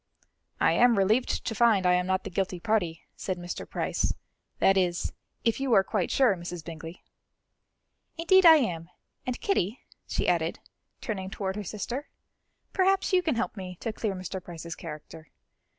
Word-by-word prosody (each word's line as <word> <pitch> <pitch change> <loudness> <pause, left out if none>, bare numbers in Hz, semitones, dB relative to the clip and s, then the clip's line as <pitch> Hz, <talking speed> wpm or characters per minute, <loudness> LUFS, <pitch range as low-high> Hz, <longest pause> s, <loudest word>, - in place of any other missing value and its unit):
"I - - +4
am 240 -2 +5
relieved 215 +6 +2
to 225 - -1
find 220 -4 +4
I 180 - +5
am 180 0 +1
not 190 0 +1
the - - -6
guilty 185 -1 -1
party," 175 -5 0
said 185 -2 -3
Mr. 175 0 -6
Price; - - -1 0.4
"that 195 - +4
is, 180 -2 0 0.3
if 230 +1 +1
you 270 -3 +1
are 195 - +6
quite 195 -3 -1
sure, 255 -7 +4
Mrs. 175 -2 -7
Bingley." 165 +1 -8 1.1
"Indeed 375 +3 +5
I 330 -2 +10
am; 175 - -1 0.4
and 250 - -2
Kitty," 245 - 0 0.3
she - - -1
added, - - +1 0.4
turning 190 -4 -4
toward 190 -1 -3
her 210 - -4
sister, 235 - -5 0.6
"perhaps 385 0 +2
you 365 - +5
can 320 -7 0
help 230 - -2
me 185 -2 -7
to 225 - -3
clear 215 -3 -2
Mr. 185 0 -5
Price's 170 -1 -7
character. 155 0 -9
195 Hz, 165 wpm, -28 LUFS, 175-235 Hz, 1.1 s, I